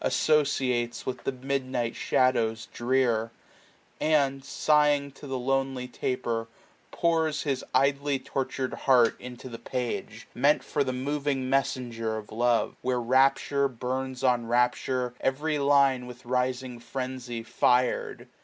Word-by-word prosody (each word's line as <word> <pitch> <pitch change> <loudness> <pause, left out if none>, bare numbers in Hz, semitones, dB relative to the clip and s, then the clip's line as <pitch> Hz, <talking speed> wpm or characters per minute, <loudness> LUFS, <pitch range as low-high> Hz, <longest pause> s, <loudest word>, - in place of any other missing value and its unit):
Associates 130 -6 +1
with 130 - -5
the - - +1
midnight 130 -2 -2
shadows 115 -3 +1
drear; 120 -2 +1 0.7
And, 140 -3 +2
sighing 145 0 +2
to 140 +1 -12
the 135 -1 -2
lonely 135 0 -1
taper, 120 -2 -2 0.4
pours 160 -2 +1
His 135 -3 -1
idly. 140 +1 +2
tortured 130 0 -3
heart 125 -4 +4
into 125 0 -9
the 115 -2 -8
page, 120 -2 -4
1040 - - -12
Meant 145 +3 +4
for 145 - 0
the 130 - -2
moving 135 0 -2
messenger 120 -5 -1
of 105 -1 -9
love; 120 +1 +1
Where 125 -1 0
rapture 135 +3 +3
burns 130 +1 -4
on 120 -3 +2
rapture, 125 +1 +1
every 150 +3 0
line 140 -3 +3
With 125 0 -11
rising 125 0 -1
frenzy 125 -1 -5
fir*d. 125 +1 +1
130 Hz, 125 wpm, -27 LUFS, 120-135 Hz, 0.7 s, heart